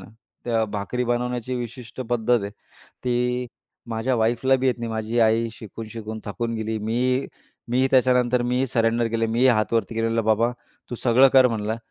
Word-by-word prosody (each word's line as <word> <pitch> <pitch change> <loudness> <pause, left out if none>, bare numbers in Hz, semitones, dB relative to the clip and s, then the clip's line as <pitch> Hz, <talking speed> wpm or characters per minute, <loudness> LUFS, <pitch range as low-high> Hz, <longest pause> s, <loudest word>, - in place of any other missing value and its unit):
ना, 95 - -12 0.4
त्या 115 -2 +1
भाकरी 105 +4 -3
बनवण्याची 125 +1 -2
विशिष्ट 120 +1 -7
पद्धत 120 -2 +1
आहे, 100 - -4 0.5
ती 125 0 0 0.4
माझ्या 115 +3 0
वाईफला 120 +4 +2
बी 130 - -1
येत 125 - 0
नाही. 115 -1 -4
माझी 110 +2 -1
आई 115 +1 +3
शिकून-शिकून 110 0 -8
थकून 115 +3 -3
गेली. 110 0 -3
मी 125 +5 0 0.4
मी 130 +2 +3
त्याच्यानंतर 125 -1 +3
मी 125 +2 0
सरेंडर 115 -1 +1
केलं. 115 0 0
मीही 120 +3 +3
हात 110 -3 +2
वरती 115 0 0
केलेलं 115 0 0
"बाबा, 110 +2 +2 0.4
तू - - -3
सगळं 130 +2 +6
कर 130 -1 +7
म्हणलं, 110 -1 -2
115 Hz, 165 wpm, -23 LUFS, 110-125 Hz, 0.5 s, कर